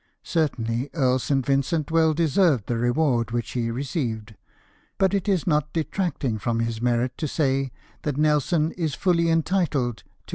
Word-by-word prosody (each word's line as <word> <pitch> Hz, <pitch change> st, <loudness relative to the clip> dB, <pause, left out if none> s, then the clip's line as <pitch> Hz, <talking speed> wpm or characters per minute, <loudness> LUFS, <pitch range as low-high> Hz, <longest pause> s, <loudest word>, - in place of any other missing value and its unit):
Certainly 130 Hz, -6 st, -1 dB
Earl 130 Hz, -4 st, +2 dB
St. 135 Hz, 0 st, 0 dB
Vincent 140 Hz, +3 st, 0 dB
well 160 Hz, -1 st, +3 dB
deserved 160 Hz, -, +2 dB
the 120 Hz, -, -1 dB
reward 120 Hz, -1 st, +1 dB
which 120 Hz, -1 st, -3 dB
he 120 Hz, -2 st, -1 dB
received; 115 Hz, -4 st, -3 dB, 0.6 s
but 190 Hz, 0 st, +2 dB
it 200 Hz, +1 st, 0 dB
is 185 Hz, -5 st, +1 dB
not 150 Hz, -3 st, +1 dB
detracting 155 Hz, -, -2 dB
from 115 Hz, +2 st, -1 dB
his 115 Hz, -1 st, -2 dB
merit 120 Hz, +1 st, +1 dB
to 155 Hz, -, -1 dB
say 135 Hz, -3 st, 0 dB, 0.3 s
that 145 Hz, -2 st, -2 dB
Nelson 155 Hz, +2 st, +2 dB
is 160 Hz, -5 st, -2 dB
fully 170 Hz, -3 st, +2 dB
entitled 160 Hz, -, +1 dB
to -, -, -18 dB
r. -, -, -36 dB
140 Hz, 160 wpm, -24 LUFS, 120-165 Hz, 0.6 s, well